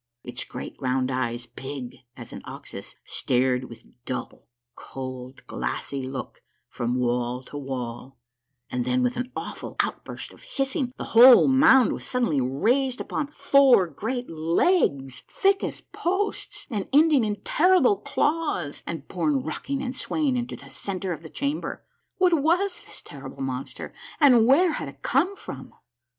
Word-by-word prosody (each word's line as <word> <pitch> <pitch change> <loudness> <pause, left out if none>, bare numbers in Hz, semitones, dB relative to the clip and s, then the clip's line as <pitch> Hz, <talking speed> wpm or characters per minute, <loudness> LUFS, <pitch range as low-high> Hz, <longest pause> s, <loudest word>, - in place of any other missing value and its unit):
Its 125 0 -3
great - - -8
round 130 0 0
eyes, 120 -1 -2
big 130 +1 -7 0.2
as 120 -2 -9
an - - -7
ox's, - - -9
stared 125 0 +1
with 115 -2 -12
a - - -24
dull, 125 -2 -5 0.3
cold, 130 0 -8
glassy 60 - -3
look 130 0 -6 0.3
from 120 +1 -2
wall 125 +1 -1
to 145 - -12
wall, 130 -2 -5 0.5
and 125 -1 -1
then, 125 0 +1
with 125 - +1
an 250 +1 -4
awful - - -6
outburst - - -3
of - - -18
hissing, 270 - -2
the - - -4
whole 245 +3 +9
mound 265 -2 +6
was - - -6
suddenly 235 - 0
raised 245 - +1
upon 300 - -3
four 275 -7 +5
great 225 - -4
legs, 160 - +1
thick 390 0 +2
as - - -4
posts, 385 +4 -3
and 205 -4 -3
ending 295 -2 +5
in 210 -1 0
terrible 375 +5 +4
claws, 295 - -1
and 160 -4 -5
borne 150 -7 0
rocking 275 - -3
and 255 0 -4
swaying 290 -1 0
into 240 -1 -3
the - - -13
centre 190 -2 -4
of 155 - -8
the 160 - -10
chamber. 285 - -3 0.3
What 365 -2 +4
was 345 +5 +2
this - - -11
terrible - - -8
monster, 130 0 -5 0.3
and 250 -7 +6
where 325 +7 +5
had - - -4
it - - -16
come 390 +3 +2
from - - -9
180 Hz, 155 wpm, -25 LUFS, -, 0.5 s, whole